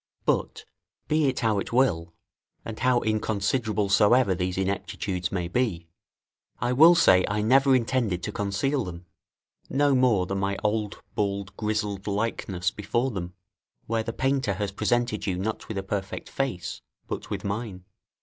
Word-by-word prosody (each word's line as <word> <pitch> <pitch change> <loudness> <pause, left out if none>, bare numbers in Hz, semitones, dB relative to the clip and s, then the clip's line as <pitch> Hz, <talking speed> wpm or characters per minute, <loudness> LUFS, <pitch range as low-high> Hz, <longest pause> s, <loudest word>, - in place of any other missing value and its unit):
But, - - -1 0.4
be 155 -1 +2
it 130 - -1
how 110 -3 +2
it - - -5
will, 85 -10 +1 0.5
and 110 -1 -6
how 125 -1 +3
inconsiderable 110 0 0
soever 105 +2 +4
these 90 0 -2
ineptitudes 95 -2 -2
may 90 -3 -2
be, 90 -5 -1 0.7
I 120 +1 0
will 165 +7 +8
say 95 - +5
I 105 +1 -1
never 135 +4 +5
intended 115 -7 0
to 105 - -3
conceal 105 +8 -1
them, 85 -2 -8 0.6
no 145 +1 +3
more 125 -8 +3
than 95 +2 -2
my 100 0 -1
old 105 -1 -1
bald 100 -1 -2
grizzled 105 -2 -2
likeness 100 -4 -1
before 120 +5 -1
them, 90 -3 -5 0.5
where 115 0 0
the 115 - -4
painter 130 -5 0
has 100 +1 -2
presented 110 +1 0
you 90 -2 0
not 105 +4 -3
with 110 - -5
a 95 - -2
perfect 95 0 -4
face, 90 -11 -3 0.3
but - - -5
with - - -4
mine. 100 -3 -4
105 Hz, 155 wpm, -26 LUFS, 95-120 Hz, 0.7 s, will